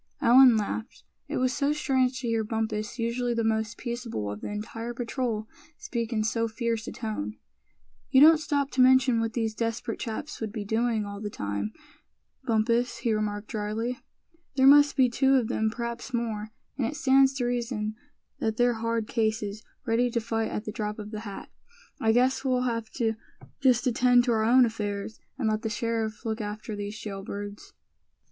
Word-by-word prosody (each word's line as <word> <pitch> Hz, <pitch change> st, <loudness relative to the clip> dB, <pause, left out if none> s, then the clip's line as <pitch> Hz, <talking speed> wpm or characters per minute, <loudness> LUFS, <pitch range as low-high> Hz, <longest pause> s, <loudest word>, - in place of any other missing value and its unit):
Allan 250 Hz, -1 st, +7 dB
laughed. 220 Hz, +2 st, -4 dB, 0.2 s
It -, -, -3 dB
was 255 Hz, 0 st, +1 dB
so 285 Hz, +1 st, +1 dB
strange 260 Hz, -4 st, +1 dB
to 245 Hz, -, -3 dB
hear 225 Hz, -1 st, +1 dB
Bumpus, 220 Hz, 0 st, -3 dB
usually 235 Hz, +1 st, -1 dB
the 230 Hz, -, 0 dB
most 220 Hz, 0 st, 0 dB
peaceable 235 Hz, -, -4 dB
of 105 Hz, -, -7 dB
the -, -, -5 dB
entire 225 Hz, +3 st, -5 dB
patrol, 235 Hz, -2 st, -2 dB, 0.3 s
speak 235 Hz, -2 st, -4 dB
in 215 Hz, -2 st, 0 dB
so 230 Hz, +1 st, 0 dB
fierce 230 Hz, 0 st, -2 dB
a -, -, -4 dB
tone. 110 Hz, -, -4 dB, 0.7 s
"You 260 Hz, -, +5 dB
don't 310 Hz, +2 st, +8 dB
stop 285 Hz, -2 st, -1 dB
to 260 Hz, -, +2 dB
mention 255 Hz, -2 st, +5 dB
what 225 Hz, -1 st, -2 dB
these 225 Hz, -2 st, -1 dB
desperate 230 Hz, 0 st, -3 dB
chaps 235 Hz, +6 st, -5 dB
would 220 Hz, -2 st, -3 dB
be 210 Hz, -2 st, -5 dB
doing 225 Hz, 0 st, 0 dB
all 200 Hz, 0 st, -7 dB
that 210 Hz, -1 st, -5 dB
time, 100 Hz, +1 st, -3 dB, 0.7 s
Bumpus," 235 Hz, +1 st, +1 dB
he 230 Hz, -, +3 dB
remarked, 210 Hz, 0 st, -2 dB
drily. 225 Hz, +3 st, -3 dB, 0.6 s
"There 265 Hz, -1 st, +4 dB
must 290 Hz, +1 st, +7 dB
be 260 Hz, -2 st, +5 dB
two 265 Hz, +3 st, +3 dB
of 245 Hz, -4 st, +2 dB
them, 220 Hz, -2 st, +1 dB
perhaps 235 Hz, +2 st, -4 dB
more; 220 Hz, -3 st, -2 dB, 0.3 s
and 240 Hz, -, +1 dB
it 300 Hz, -, -4 dB
stands 270 Hz, -1 st, +4 dB
to 250 Hz, -3 st, -1 dB
reason 235 Hz, -3 st, -2 dB, 0.4 s
that 220 Hz, 0 st, -1 dB
they're 245 Hz, 0 st, +3 dB
hard 230 Hz, -1 st, -1 dB
cases, 220 Hz, -3 st, -1 dB, 0.2 s
ready 235 Hz, +2 st, +2 dB
to 235 Hz, -, 0 dB
fight 225 Hz, -1 st, -2 dB
at 210 Hz, -, -4 dB
the 215 Hz, -, -3 dB
drop 210 Hz, -1 st, -4 dB
of 210 Hz, -1 st, -7 dB
the 215 Hz, -, -4 dB
hat. 205 Hz, -3 st, -8 dB, 0.5 s
I 220 Hz, -, +3 dB
guess 255 Hz, +3 st, +2 dB
we'll 255 Hz, -2 st, +1 dB
have 230 Hz, -3 st, -2 dB
to 225 Hz, -3 st, 0 dB, 0.5 s
just 255 Hz, -3 st, +3 dB
attend 245 Hz, 0 st, +4 dB
to 240 Hz, -, +1 dB
our 220 Hz, -1 st, +2 dB
own 250 Hz, +2 st, +6 dB
affairs, 210 Hz, -2 st, -4 dB, 0.2 s
and 255 Hz, -5 st, -1 dB
let 215 Hz, 0 st, 0 dB
the 225 Hz, -, -2 dB
sheriff 225 Hz, 0 st, -2 dB
look 220 Hz, 0 st, -2 dB
after 210 Hz, +1 st, -5 dB
these 205 Hz, +1 st, -5 dB
jail 195 Hz, -3 st, -6 dB
birds." 205 Hz, 0 st, -7 dB
230 Hz, 185 wpm, -27 LUFS, 215-245 Hz, 0.7 s, don't